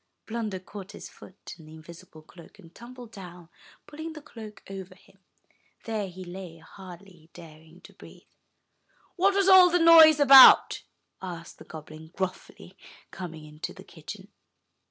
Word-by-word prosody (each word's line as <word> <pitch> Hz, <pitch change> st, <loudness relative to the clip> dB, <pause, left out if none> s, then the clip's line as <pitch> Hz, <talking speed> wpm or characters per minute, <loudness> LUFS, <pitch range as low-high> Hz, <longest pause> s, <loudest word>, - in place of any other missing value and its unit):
Blunder 220 Hz, -4 st, -5 dB
caught 195 Hz, +1 st, -12 dB
his -, -, -11 dB
foot 190 Hz, -, -15 dB
in 155 Hz, -, -16 dB
the 155 Hz, -, -14 dB
invisible 160 Hz, 0 st, -16 dB
cloak, 170 Hz, +4 st, -18 dB
and 170 Hz, -4 st, -19 dB
tumbled 245 Hz, -1 st, -14 dB
down, 180 Hz, -5 st, -13 dB, 0.4 s
pulling 315 Hz, +2 st, -10 dB
the 305 Hz, -, -12 dB
cloak 215 Hz, -5 st, -13 dB
over 195 Hz, -1 st, -10 dB
him. -, -, -26 dB, 0.7 s
There 220 Hz, -3 st, -4 dB
he 185 Hz, +1 st, -12 dB
lay, 175 Hz, -2 st, -11 dB
hardly 175 Hz, 0 st, -16 dB
daring 160 Hz, +1 st, -17 dB
to -, -, -17 dB
breathe. -, -, -17 dB, 0.9 s
*'What 390 Hz, +2 st, +1 dB
was 395 Hz, -1 st, +1 dB
all 375 Hz, -2 st, +7 dB
that 355 Hz, 0 st, 0 dB
noise 320 Hz, -2 st, +7 dB
about?" 275 Hz, -2 st, +7 dB, 0.4 s
asked 170 Hz, -3 st, -10 dB
the -, -, -14 dB
goblin 155 Hz, 0 st, -13 dB
gruffly, 190 Hz, -1 st, -8 dB, 0.4 s
coming 165 Hz, -4 st, -10 dB
into 150 Hz, 0 st, -10 dB
the -, -, -14 dB
kitchen. -, -, -13 dB
190 Hz, 150 wpm, -25 LUFS, 165-235 Hz, 0.9 s, all